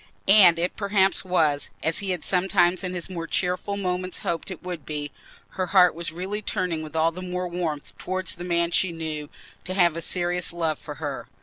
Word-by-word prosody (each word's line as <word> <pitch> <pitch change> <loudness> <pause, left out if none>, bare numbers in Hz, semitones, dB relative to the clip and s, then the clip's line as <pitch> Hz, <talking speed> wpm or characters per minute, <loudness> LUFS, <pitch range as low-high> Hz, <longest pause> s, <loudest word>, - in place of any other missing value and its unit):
And 190 -4 +8
it 175 +2 -1
perhaps 200 -1 +2
was, 160 -6 +2
as 165 - +1
he 200 -2 -3
had 180 -3 -2
sometimes 180 -1 +3
in 180 0 -3
his 175 - -2
more 170 -3 -5
cheerful 180 +3 -1
moments 185 -1 -2
hoped 170 +2 -2
it 185 -2 -8
would 175 -4 -5
be—her 150 +5 -6
heart 180 -1 +6
was 170 -1 -4
really 190 +5 -4
turning 180 -5 -1
with 155 0 -8
all 160 +1 +3
the 180 +2 -8
more 180 0 -3
warmth 170 -4 -4
towards 185 -1 -2
the 175 - -8
man 170 -1 +1
she 185 +1 +2
knew 155 -3 -5 0.3
to 185 - -5
have 175 -4 +4
a 165 - -3
serious 175 +1 0
love 165 -3 -1
for 150 - -8
her. 145 -5 -5
175 Hz, 200 wpm, -25 LUFS, 165-185 Hz, 0.3 s, And